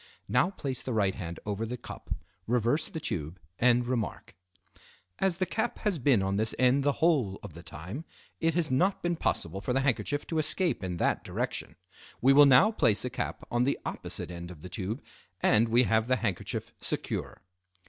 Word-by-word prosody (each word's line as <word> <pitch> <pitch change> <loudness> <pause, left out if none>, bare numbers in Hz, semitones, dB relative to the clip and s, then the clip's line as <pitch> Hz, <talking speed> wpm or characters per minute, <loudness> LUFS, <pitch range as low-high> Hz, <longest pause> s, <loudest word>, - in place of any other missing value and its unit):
Now 125 +8 +3
place 140 -9 -4
the 130 - -3
right 100 -3 +2
hand 85 -1 -6
over 105 +1 -2
the 120 +2 -3
cup, 120 - -10 0.4
reverse 120 +5 +1
the 160 - -5
tube, 85 - -4 0.2
and 120 0 +4
remark:— 120 -4 -3 0.8
"As 190 -3 +2
the 185 - +1
cap 225 +5 -2
has 200 -6 +1
been 120 -6 +3
on 95 +1 0
this 110 +1 0
end 130 +2 +4
the 145 0 +3
whole 130 - +3
of 100 -6 -8
the 85 - -10
time, 90 - -7 0.4
it 165 -1 +1
has 165 -4 +1
not 185 +9 +2
been 175 0 +1
possible 95 - -2
for 125 - -1
the 135 - +2
handkerchief 145 +2 0
to 160 - -1
escape 155 - +2
in 90 -2 -3
that - - +1
direction. - - -3 0.4
We 135 +2 +5
will 145 +1 +8
now 165 - +7
place 115 - +2
a 125 - -3
cap - - -4
on 120 +1 +2
the 140 - +1
opposite - - -4
end 85 0 -7
of 85 -4 -11
the 90 - -8
tube 100 +7 -4 0.4
and 110 +4 +4
we 120 +2 +5
have 110 -1 +2
the 130 - +3
handkerchief 105 -7 -3
secure." - - -2
125 Hz, 195 wpm, -29 LUFS, 100-145 Hz, 0.8 s, will